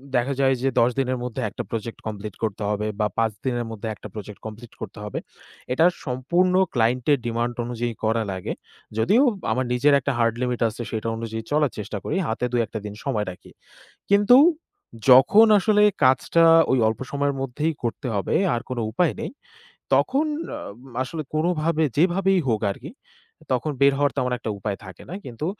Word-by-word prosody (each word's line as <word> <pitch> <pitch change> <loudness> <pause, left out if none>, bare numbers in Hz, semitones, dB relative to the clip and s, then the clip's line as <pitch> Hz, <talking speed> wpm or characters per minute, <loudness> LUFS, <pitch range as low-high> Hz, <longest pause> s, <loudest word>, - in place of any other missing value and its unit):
দেখা 125 +3 +1
যায় 135 -1 +4
যে, 135 - +2
১০ 120 - +5
দিনের 130 -1 0
মধ্যে 125 +1 -4
একটা - - -6
প্রজেক্ট 115 0 -4
কমপ্লিট 105 -2 -6
করতে 105 -1 -2
হবে 105 0 -1
বা 105 - +2
৫ 115 -1 +2
দিনের 120 -2 -1
মধ্যে 110 0 -6
একটা 105 - -10
প্রজেক্ট 105 -1 -8
কমপ্লিট 110 +2 -9
করতে - - -7
হবে। 105 - -4 0.5
এটা 160 - +4 0.2
সম্পূর্ণ 170 +9 +1 0.2
ক্লায়েন্ট 120 +1 +1
এর 140 - +4
ডিমান্ড 120 +1 -1
অনুযায়ী 120 -1 -3
করা 110 +1 +1
লাগে। 95 -1 -4 0.4
যদিও 205 - +4 0.3
আমার 130 0 0
নিজের 140 +4 +3
একটা 140 +2 -1
হার্ড 115 -1 +2
লিমিট 125 -1 -1
আছে 110 +2 -8
সেটা 110 0 -3
অনুযায়ী 110 -1 -5
চলার 150 -3 +2
চেষ্টা 105 0 -5
করি, - - -2
হাতে 115 +2 -1
২ 120 -1 +2
১টা 110 - -6
দিন 105 - -5
সময় 110 -7 -1
রাখি। 90 - -15 0.6
কিন্তু 205 +5 +6 0.7
যখন 160 - +8
আসলে 210 +1 +3 0.2
কাজটা 130 +6 +4 0.3
ওই 130 - +3
অল্প 110 - -1
সময়ের 140 0 0
মধ্যেই 150 +5 -1
করতে 120 +3 -3
হবে 100 - -1 0.2
আর 115 - -2
কোন 130 - -4
উপায় 165 +8 +1
নেই, 230 - -3 0.7
তখন 280 +4 +2 0.3
অ - - -6 0.4
আসলে 155 +5 -5
কোনভাবে 160 0 +1
যেভাবেই 185 +3 +3
হোক 110 -2 +1
আরকি 125 +8 -10 0.6
তখন 130 +4 0
বের 140 0 +6
হওয়ার 145 -2 +2
তেমন 125 0 0
একটা 110 - -4
উপায় 100 0 -3
থাকে 95 -2 -11
না। - - -5
কিন্তু 125 +4 -5
125 Hz, 180 wpm, -23 LUFS, 110-150 Hz, 0.7 s, যখন